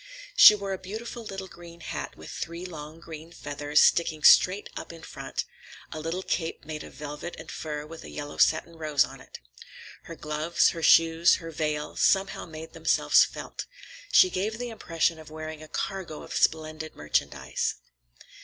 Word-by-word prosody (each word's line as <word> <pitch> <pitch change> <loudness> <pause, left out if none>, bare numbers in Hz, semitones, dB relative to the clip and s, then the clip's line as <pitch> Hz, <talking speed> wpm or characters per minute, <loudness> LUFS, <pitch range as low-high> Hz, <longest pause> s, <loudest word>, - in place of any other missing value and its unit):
She 210 - +10
wore 200 -1 -4
a 190 - -5
beautiful 225 +5 -7
little 195 -3 -6
green 170 -1 -13
hat - - -6
with - - -10
three 170 +2 -6
long 155 -2 -9
green 160 0 -10
feathers 145 -2 0
sticking 160 -2 +3
straight 190 +3 +6
up - - -7
in 165 -1 -12
front, - - -5 0.5
a 155 - -5
little 165 +4 -3
cape 165 -4 -3
made 155 0 -6
of - - -12
velvet 150 +3 -7
and 160 - -9
fur 150 -1 -5
with 160 +1 -10
a - - -10
yellow 145 0 -7
satin 165 +1 +2
rose 150 -3 +3
on - - -12
it. - - -12 0.7
Her 165 - -8
gloves, 155 +2 +1
her 165 - -5
shoes, 165 +1 +5
her 165 -1 -7
veil, 150 -1 -2
somehow 195 -1 +2
made 160 0 -9
themselves 165 0 +4
felt. - - -7 0.4
She 370 -1 +6
gave 215 +4 -2
the 245 0 -4
impression 165 -6 -1
of 155 - -12
wearing 155 0 -7
a 155 - -10
cargo 185 -2 -4
of - - -9
splendid 155 0 0
merchandise. 75 0 -1
160 Hz, 175 wpm, -27 LUFS, 155-175 Hz, 0.7 s, She